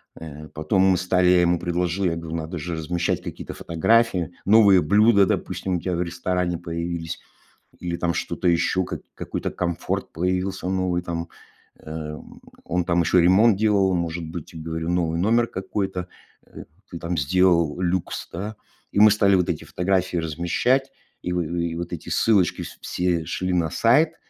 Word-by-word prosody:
э, 75 -1 -9
потом 80 +5 0
мы 95 -1 +4
стали 90 0 +2
я 90 -1 +5
ему 85 -1 +2
предложил, 90 +2 -1
я 85 -2 +1
говорю: 85 0 -5
"Надо 80 +2 -5
же 85 +2 -4
размещать 85 +2 -1
какие-то - - -7
фотографии. 90 +1 +1
Новые 100 -3 +6
блюда, 100 +4 +5
допустим, 95 0 -2
у 85 - -2
тебя 90 -2 -2
в 85 - -1
ресторане 90 0 -1
появились 85 -1 -4 0.6
или 85 -1 -3
там 85 -1 -1
что-то 90 - -1
ещё, 90 +2 +2
как - - -6
какой-то - - -4
комфорт 85 -2 -3
появился 90 +2 -2
новый 95 -2 0
там". 85 -1 -4 0.5
Э, 80 -1 -6 0.5
он 90 0 0
там 85 0 +1
ещё 90 +2 +3
ремонт 95 +6 +5
делал. 100 -3 +3
Он, 90 - +1
может 85 0 -3
быть, 80 -2 -7
я 80 - -8
говорю, 80 +1 -4
новый 85 -2 0
номер 115 +6 +2
какой-то, 95 -1 -4 0.4
э, - - -11 0.2
ты 85 - -7
там 85 +1 -3
сделал 85 +2 +2
люкс, 90 -1 -2
да. 105 +5 -5 0.3
И - - 0
мы 105 +1 +9
стали 100 -2 +4
вот 90 -1 +2
эти 80 - -2
фотографии 90 -1 -1
размещать. 85 - 0 0.3
И 90 - -3
в 90 - 0
и 85 0 -2
вот 85 +1 -5
эти 85 - -6
ссылочки 100 -6 +2
вс - - -10
все 90 -3 -1
шли 95 +2 -2
на 85 -3 +1
сайт. 155 - +3
90 Hz, 175 wpm, -23 LUFS, 85-95 Hz, 0.6 s, мы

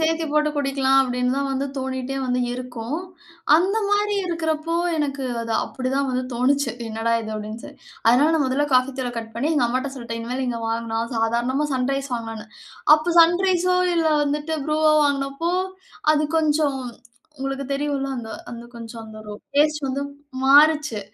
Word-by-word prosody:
சேர்த்துப் 320 -1 0
போட்டு 300 0 +3
குடிக்கலாம்." 270 -1 +2
அப்பிடின்னு 250 -1 0
தான் 275 0 -2
தோணிட்டே 260 0 -3
வந்து 250 0 0
இருக்கும். 250 +2 -5 0.6
அந்தமாரி 410 +2 +1
இருக்கிறப்போ, 330 -1 -1 0.2
எனக்கு 280 -3 -2 0.2
அது 230 -1 -3
அப்பிடி 255 -1 -4
தான் 275 -1 +1
வந்து 255 0 -1
தோணுச்சு. 265 +1 +2 0.2
"என்னடா! 225 +1 -1
இது" 220 -1 -6
அப்பிடின்னு 215 +2 -6
சொ - - -8 0.4
அதனால 265 +7 +5
நான் 305 - +2
முதல 275 +3 +1
காஃபித்தூள 255 0 +1
கட் 225 0 -7
பண்ணி, 275 +7 0
எங்க 260 -5 +3
அம்மாட்ட 260 +3 -1
சொல்ட்டேன். 230 -2 -5
இனிமேலு 250 +3 -3
இங்க 235 -1 -3
வாங்குனா 225 0 -2 0.2
சாதாரணமா 240 +6 +1
'சன்ரைஸ்' 270 +1 -1
வாங்கலான்னு. 225 -2 -6 0.5
அப்ப 320 +3 -1
'சன்ரைஸ்ஸோ' 365 +1 +3
இல்ல 330 -1 +2 0.2
வந்துட்டு 295 +2 -2
'ப்ரூவோ' 310 0 +3
வாங்கினப்போ, 280 +4 -1 0.6
அது 305 0 +2
கொஞ்சம், 300 -3 +2 0.6
உங்களுக்கு 270 +1 -3
தெரியும்ல. 280 -1 -1
அந்த 225 -2 -7 0.2
அந்த 235 0 -8
கொஞ்சம் 230 0 -8
அந்த 220 0 -11
ஒரு 210 - -7 0.2
டேஸ்ட் 300 -1 +3
வந்து 275 +2 -2 0.4
மாறுச்சு. 295 -4 +5
275 Hz, 150 wpm, -23 LUFS, 245-305 Hz, 0.6 s, அதனால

